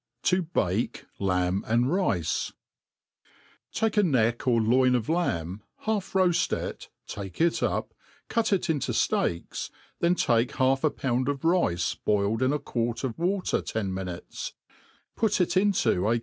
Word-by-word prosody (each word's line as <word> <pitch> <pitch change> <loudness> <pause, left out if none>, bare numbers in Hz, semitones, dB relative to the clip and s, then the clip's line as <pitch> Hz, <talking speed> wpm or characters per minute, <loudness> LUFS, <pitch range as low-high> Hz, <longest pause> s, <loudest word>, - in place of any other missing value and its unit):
To 180 -3 +2
make - - 0
Lamb 90 0 +1
and 120 +2 +3
RUe^ 135 - 0 1.2
TAKE 220 -1 0
a - - +7
neck 120 - +2
pr - - -1
loin 125 +2 +4
of 120 0 -1
lamb, 95 - -1 0.2
half 215 -3 -2
roaft 185 -3 +2
ie^ - - -6 0.2
take 95 -2 -7
tC 170 0 +2
iip» - - -3 0.4
cut 230 -2 0
it 195 -2 +1
into 155 -5 0
fteaks^ 85 0 -1 0.3
then 170 +1 +3
take 120 -6 +1
half 130 +1 +2
a 155 - +4
pound 130 -1 -1
of 140 +1 -3
rice 100 - +2
boiIe4 105 +1 +2
tn 130 +1 +2
a 150 - +1
q^uart 120 -4 -2
of 130 -1 -3
water 185 +2 0
ten 105 -4 -3
nainutes, 95 -2 -5 0.6
put 220 -3 +1
it 180 0 +1
into 185 - +2
a. 120 +1 +2
130 Hz, 150 wpm, -27 LUFS, 105-175 Hz, 1.2 s, a